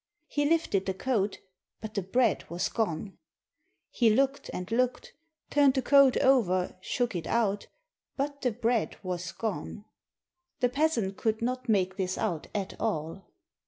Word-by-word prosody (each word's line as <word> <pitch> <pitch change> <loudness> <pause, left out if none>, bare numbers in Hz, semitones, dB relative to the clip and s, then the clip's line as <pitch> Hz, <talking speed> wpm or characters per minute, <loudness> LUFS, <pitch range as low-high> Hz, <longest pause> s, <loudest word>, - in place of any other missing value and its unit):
He 290 0 -1
lifted 315 - +1
the 190 - -1
coat, 210 -3 0 0.4
but 220 -1 -7
the 200 - -1
bread 225 +4 +1
was 175 +1 -1
gone! 200 -3 -2 0.7
He 235 -3 +3
looked 270 +5 +1
and 180 +3 -6
looked, 250 +2 0 0.4
turned 285 -2 +5
the 265 - +1
coat 275 -1 +6
over, 185 -9 +3
shook 240 +2 -1
it 170 - -3
out 205 -3 0 0.2
— - - -63
but 280 +1 -2
the 255 - +2
bread 230 0 0
was 180 -1 -3
gone. 215 -1 -4 0.7
The 250 -2 +3
peasant 250 -8 0
could 220 0 -1
not 255 +1 -2
make 190 -3 +2
this 185 -1 -1
out 175 -8 -2
at 200 -2 -2
all. 160 +5 -3
220 Hz, 155 wpm, -29 LUFS, 190-255 Hz, 0.7 s, coat